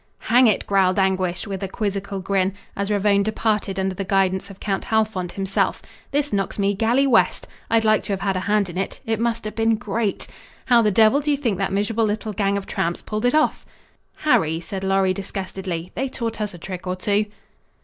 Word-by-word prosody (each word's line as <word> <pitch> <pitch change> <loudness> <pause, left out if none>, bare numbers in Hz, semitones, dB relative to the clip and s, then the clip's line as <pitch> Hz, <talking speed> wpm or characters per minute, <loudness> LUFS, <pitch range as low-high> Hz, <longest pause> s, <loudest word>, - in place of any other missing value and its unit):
"Hang 250 0 +7
it," 215 - +1
growled 190 -1 +2
Anguish, 190 -2 +1
with 195 -3 -5
a 195 - -2
quizzical 200 -1 -3
grin, 195 0 0 0.2
as 200 +1 -2
Ravone 205 -1 +3
departed 215 -2 -1
under 190 0 0
the 195 - -4
guidance 190 0 +1
of 195 - -12
Count 195 -2 -2
Halfont 215 -5 0
himself, 195 0 0 0.3
"this 290 -3 0
knocks 195 -1 -1
me 200 0 +2
galley 235 +6 +2
west. 255 -4 +2 0.2
I'd 225 -1 +3
like 215 -1 +4
to 200 - -1
have 195 - -3
had 195 -1 0
a - - 0
hand 205 +1 +1
in 180 +1 -5
it. 195 - -3
It 225 -2 -1
must 230 -1 -1
have 215 - -4
been 225 0 +2
great. 215 0 -2 0.4
How 240 -2 +5
the 215 - +3
devil 220 +6 +5
do 295 +1 -2
you 290 - +3
think 230 -9 -1
that 195 - 0
miserable 210 +3 +1
little 215 0 -2
gang 200 0 +1
of 200 - -5
tramps 170 +1 -2
pulled 215 +2 -3
it 245 - +3
off?" 310 - +2 0.5
"Harry," 180 - +2
said 190 +3 -6
Lorry 195 -1 +2
disgustedly, 185 -3 -5
"they 270 +2 -2
taught 230 -4 -4
us 210 -3 -3
a - - -9
trick 180 +1 -7
or 180 - -1
two." 205 +3 0
200 Hz, 210 wpm, -22 LUFS, 190-220 Hz, 0.5 s, Hang